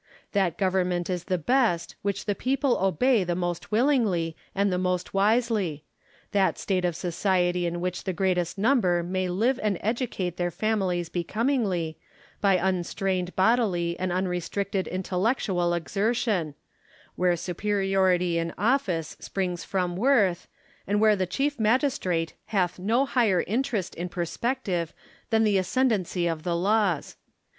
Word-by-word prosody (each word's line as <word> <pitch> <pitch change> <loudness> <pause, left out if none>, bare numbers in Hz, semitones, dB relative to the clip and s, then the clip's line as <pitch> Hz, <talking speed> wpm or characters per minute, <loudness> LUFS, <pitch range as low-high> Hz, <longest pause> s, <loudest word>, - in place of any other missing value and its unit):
That 190 -5 +1
government 185 -2 0
is 180 -1 -3
the 185 - 0
best 215 - +1
which 200 -1 -2
the 205 - +1
people 265 +3 0
obey 200 - +3
the 175 -1 -1
most 175 +2 -3
willingly 215 - +2 0.2
and 200 -1 +2
the 180 - 0
most 180 -1 -1
wisely; 205 -6 +1 0.5
that 200 -3 +2
state 185 -2 -1
of 175 -2 0
society 175 0 0
in 170 0 -3
which 180 0 -3
the 190 - 0
greatest 180 -1 0
number 195 -6 +2
may 185 +1 -1
live 230 +9 +1
and 210 -3 0
educate 210 -6 -2
their 175 0 0
families 185 -4 -1
becomingly, 185 - -1 0.4
by 195 -2 +4
unstrained 185 0 -1
bodily 185 -5 +2
and 185 0 -1
unrestricted 185 +2 -2
intellectual 185 -1 0
exertion; 195 - -1 0.6
where 180 -1 +2
superiority 185 -1 +1
in 165 0 -3
office 195 - 0
springs 180 -3 -3
from 180 -2 -1
worth, 205 -5 +2 0.4
and 205 +2 +1
where 215 -1 +5
the 185 -2 -1
chief 275 +10 -1
magistrate 215 - +1
hath 185 -4 0
no 230 +8 +2
higher 225 -9 +2
interest 225 -3 -1
in 175 +2 -5
perspective 180 -1 -2 0.3
than 225 0 +3
the 205 -3 +3
ascendancy 190 -4 0
of 165 -2 -1
the 175 +1 -1
laws. 195 -2 +1
185 Hz, 135 wpm, -26 LUFS, 175-215 Hz, 0.6 s, where